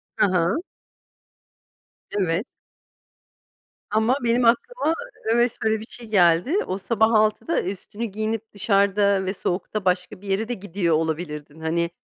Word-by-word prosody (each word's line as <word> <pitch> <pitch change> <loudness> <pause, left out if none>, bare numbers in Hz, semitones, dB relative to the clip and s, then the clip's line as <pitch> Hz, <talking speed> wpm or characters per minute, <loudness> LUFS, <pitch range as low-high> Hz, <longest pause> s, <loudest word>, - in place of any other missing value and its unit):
Hı - - +4
hı. 180 -1 +2 1.6
Evet. 185 0 0 1.4
Ama 220 +4 +2
benim 240 +1 +2
aklıma 325 - +2 0.4
evet 240 +1 +3
öyle 220 0 +2
bir 220 - -8
şey 235 0 -8
geldi. 180 - +4
O, 185 - -2
sabah 220 +2 +2
06.00'da 215 +9 +2
üstünü 200 +4 -5
giyinip 220 +1 -3
dışarıda 200 -1 +2
ve 190 - -1
soğukta, 190 +2 -3
başka 180 0 0
bir 205 - -10
yere 195 +3 0
de 245 - -2
gidiyor 185 -5 -1
olabilirdin. 155 -1 -3
Hani, 170 +1 0
200 Hz, 130 wpm, -23 LUFS, 180-220 Hz, 1.6 s, Hı